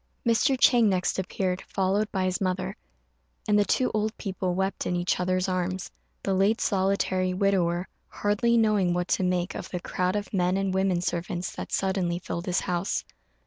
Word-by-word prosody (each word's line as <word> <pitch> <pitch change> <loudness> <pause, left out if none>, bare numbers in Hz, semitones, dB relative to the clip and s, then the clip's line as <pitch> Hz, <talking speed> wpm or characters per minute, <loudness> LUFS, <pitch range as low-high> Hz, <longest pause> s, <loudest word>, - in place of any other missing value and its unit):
Mr. 250 +4 +3
Chang 240 -4 +5
next 185 0 0
appeared, 185 0 -2
followed 195 +3 0
by 190 -2 0
his 185 +1 -1
mother; 185 +1 -1 0.7
and 210 0 +4
the - - +5
two 255 +5 +1
old 215 +1 -1
people 185 -3 -2
wept 190 +1 -1
in 180 - 0
each 175 0 0
other's 185 +1 0
arms, 185 0 -2 0.3
the 195 - 0
late 195 +4 +3
solitary 190 -2 +1
widower 185 -2 +1 0.2
hardly 210 +3 +1
knowing 210 -6 +3
what 180 0 -1
to - - +2
make 180 0 0
of - - -6
the 180 - -3
crowd 180 +2 -1
of 205 0 -3
men 180 0 +2
and 195 -1 0
women 190 -2 +1
servants 175 0 -3
that - - -6
suddenly 190 -3 0
filled 175 -1 -5
his 180 0 +1
house. 180 +1 -1
190 Hz, 180 wpm, -27 LUFS, 180-200 Hz, 0.7 s, Chang